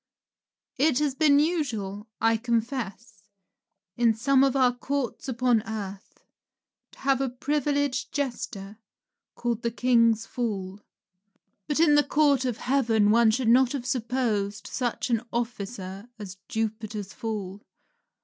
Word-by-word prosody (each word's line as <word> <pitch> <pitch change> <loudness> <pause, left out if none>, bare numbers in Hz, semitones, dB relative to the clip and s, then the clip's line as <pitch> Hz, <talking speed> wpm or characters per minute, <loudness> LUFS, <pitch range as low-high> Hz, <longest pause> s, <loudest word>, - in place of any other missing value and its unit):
It 290 -2 +3
has 295 -2 +1
been 285 0 +4
usual, 235 - -1
I 225 0 +3
confess, 230 -2 -3 0.7
in 235 -2 +3
some 265 +4 +3
of 275 -1 +2
our 255 -2 +4
Courts 275 +2 -3
upon 245 -2 +2
earth, 205 -3 -7 0.7
to - - -18
have 270 -1 +2
a 270 - 0
privileged 285 +1 -1
jester, 225 -7 -4 0.6
called 235 -1 -2
the 235 - 0
king's 230 -2 +3
fool. 200 -5 -4 0.9
But 295 - 0
in 325 -2 +5
the 295 0 +5
Court 285 -2 +2
of 245 -3 -1
Heaven 230 -6 +2
one 230 0 +5
should 240 +2 0
not 255 +2 +5
have 265 -4 -4
supposed 230 -5 -1
such 245 0 -2
an 230 -2 +2
officer 210 -3 -5
as 195 -3 -8
Jupiter's 215 -3 -4
fool. 205 -3 -5
235 Hz, 130 wpm, -26 LUFS, 215-265 Hz, 0.9 s, in